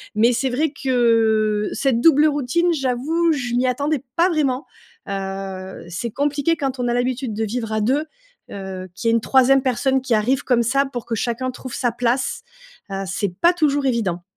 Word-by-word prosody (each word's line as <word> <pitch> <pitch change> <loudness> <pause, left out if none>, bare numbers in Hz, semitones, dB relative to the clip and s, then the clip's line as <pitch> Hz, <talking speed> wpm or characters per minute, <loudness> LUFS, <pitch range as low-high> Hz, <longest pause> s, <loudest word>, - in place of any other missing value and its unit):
Mais 230 +3 +4
c'est 250 +3 0
vrai 285 +5 0
que 225 -6 +2
cette 260 -4 +1
double 300 0 +6
routine, 300 +4 +1
j'avoue, 305 +5 0
je 245 -5 -3
m'y 250 +1 +2
attendais 285 +2 -1
pas 345 +2 +4
vraiment. 285 -4 0 0.4
Heu, 195 -1 -5
c'est 175 +7 -4
compliqué 290 +5 0
quand 270 -3 -3
on 245 - 0
a 240 - +1
l'habitude 250 -1 -1
de 220 - -1
vivre 225 +1 -4
à 215 - 0
2, 270 +8 +1 0.5
heu, 190 -1 -6
qu'il 230 - -3
y - - +4
ait - - +3
une 230 - +2
3ème 265 +2 +4
personne 260 +1 +1
qui 255 -2 -1
arrive 245 +5 +1
comme 240 -2 +2
ça. 275 +4 +2
Pour 245 -4 -6
que 235 - -4
chacun 240 +3 -2
trouve 255 0 -9
sa 245 - 0
place, 245 - -1 0.5
heu, 195 0 -3
c'est 195 0 -2
pas 345 - +6
toujours 290 -5 +1
évident. 205 -9 -1
250 Hz, 190 wpm, -21 LUFS, 225-275 Hz, 0.5 s, double